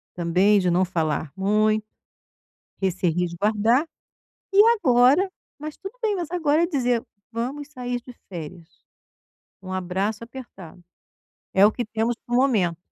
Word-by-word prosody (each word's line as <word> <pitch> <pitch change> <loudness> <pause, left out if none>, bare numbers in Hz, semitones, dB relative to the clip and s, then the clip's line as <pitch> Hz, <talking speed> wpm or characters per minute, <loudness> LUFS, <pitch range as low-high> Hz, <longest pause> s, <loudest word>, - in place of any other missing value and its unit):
também 180 +4 +3
de 180 - +1
não 180 +2 +3
falar 160 -4 -2
muito 215 +2 +2 1.0
e 190 - +3
se 180 0 0
resguardar, 205 - +1 0.7
e 395 - +6 0.2
agora 275 - +4 0.3
mas 305 0 -6
tudo 390 +6 -9
bem, 435 -3 +1
mas 340 -3 -4
agora 320 -3 +2
é 340 - +3
dizer: 250 -7 0 0.3
"Vamos 265 +6 -4
sair 245 -3 -4
de 250 - -12 0.2
férias, 170 -1 -8 0.9
um 185 - -8
abraço 190 +4 -2
apertado, 230 -9 -11 0.7
é 195 +1 +6
o 210 - +5
que 240 +2 -3
temos 225 +2 -1
para 240 - -5
o - - +4
momento". 210 -11 +2
220 Hz, 145 wpm, -24 LUFS, 185-265 Hz, 1.0 s, e